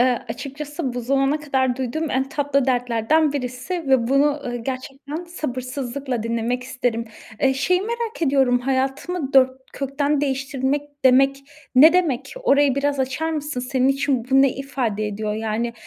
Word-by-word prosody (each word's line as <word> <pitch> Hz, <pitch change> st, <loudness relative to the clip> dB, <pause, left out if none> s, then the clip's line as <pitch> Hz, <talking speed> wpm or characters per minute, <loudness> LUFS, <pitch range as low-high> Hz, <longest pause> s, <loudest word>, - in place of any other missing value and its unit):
Eee, 245 Hz, -2 st, +2 dB
açıkçası 280 Hz, +2 st, -5 dB
bu 245 Hz, -, -2 dB
zamana 275 Hz, +4 st, +1 dB
kadar 265 Hz, -4 st, 0 dB
duyduğum 280 Hz, +5 st, -2 dB
en 265 Hz, +1 st, 0 dB
tatlı 280 Hz, -2 st, 0 dB
dertlerden 250 Hz, +5 st, +2 dB
birisi 255 Hz, +4 st, -4 dB
ve 250 Hz, -3 st, +3 dB
bunu, 275 Hz, +2 st, +4 dB
ııı, 280 Hz, -5 st, -2 dB
gerçekten 270 Hz, +6 st, -6 dB
sabırsızlıkla 255 Hz, -5 st, -4 dB
dinlemek 235 Hz, +2 st, -1 dB
isterim. 245 Hz, -3 st, -2 dB, 0.4 s
Eee, 265 Hz, 0 st, +3 dB
şeyi 360 Hz, +8 st, +1 dB
merak 465 Hz, -2 st, -4 dB
ediyorum: 265 Hz, -4 st, +3 dB
"Hayatımı 270 Hz, +4 st, -2 dB
dört 260 Hz, -1 st, +6 dB, 0.2 s
kökten 280 Hz, +1 st, -1 dB
değiştirmek" 275 Hz, 0 st, -1 dB, 0.2 s
demek 270 Hz, +2 st, +5 dB, 0.4 s
ne 310 Hz, +6 st, +8 dB
demek? 280 Hz, -7 st, 0 dB
Orayı 285 Hz, -, +4 dB
biraz 280 Hz, 0 st, 0 dB
açar 265 Hz, +5 st, -1 dB
mısın? 295 Hz, -4 st, -3 dB
Senin 255 Hz, +1 st, +1 dB
için 270 Hz, -3 st, +1 dB
bu 270 Hz, 0 st, +6 dB
ne 275 Hz, -, +3 dB
ifade 245 Hz, -6 st, -2 dB
ediyor? 210 Hz, 0 st, -3 dB
Yani, 225 Hz, +2 st, -2 dB
270 Hz, 150 wpm, -22 LUFS, 250-285 Hz, 0.4 s, ne